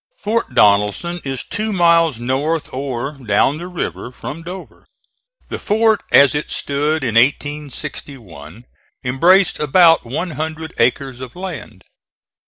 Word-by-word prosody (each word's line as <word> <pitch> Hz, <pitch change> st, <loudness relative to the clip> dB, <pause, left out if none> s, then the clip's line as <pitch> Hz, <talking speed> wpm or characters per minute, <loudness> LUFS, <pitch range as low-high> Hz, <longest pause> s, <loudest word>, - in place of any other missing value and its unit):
Fort 215 Hz, -, -2 dB
Donelson 105 Hz, -, +2 dB
is 135 Hz, -2 st, -3 dB
two 215 Hz, +1 st, -3 dB
miles 170 Hz, -, +3 dB
north, 140 Hz, +6 st, -2 dB
or 135 Hz, 0 st, -3 dB
down 125 Hz, +5 st, +1 dB
the 175 Hz, -, -7 dB
river, 175 Hz, -8 st, -5 dB
from 145 Hz, +5 st, -8 dB
Dover. 180 Hz, +3 st, -10 dB, 0.6 s
The -, -, -5 dB
fort, 220 Hz, 0 st, +2 dB
as 140 Hz, 0 st, +6 dB
it 150 Hz, 0 st, -3 dB
stood 150 Hz, +2 st, -1 dB
in 120 Hz, -4 st, -1 dB
1861, 120 Hz, -, -2 dB, 0.4 s
embraced 175 Hz, +10 st, +3 dB
about 165 Hz, +3 st, +5 dB
one 145 Hz, +9 st, -4 dB
hundred 160 Hz, +1 st, -5 dB
acres 125 Hz, +2 st, +1 dB
of 130 Hz, -2 st, -9 dB
land. 180 Hz, -4 st, -8 dB
145 Hz, 125 wpm, -18 LUFS, 125-170 Hz, 0.6 s, as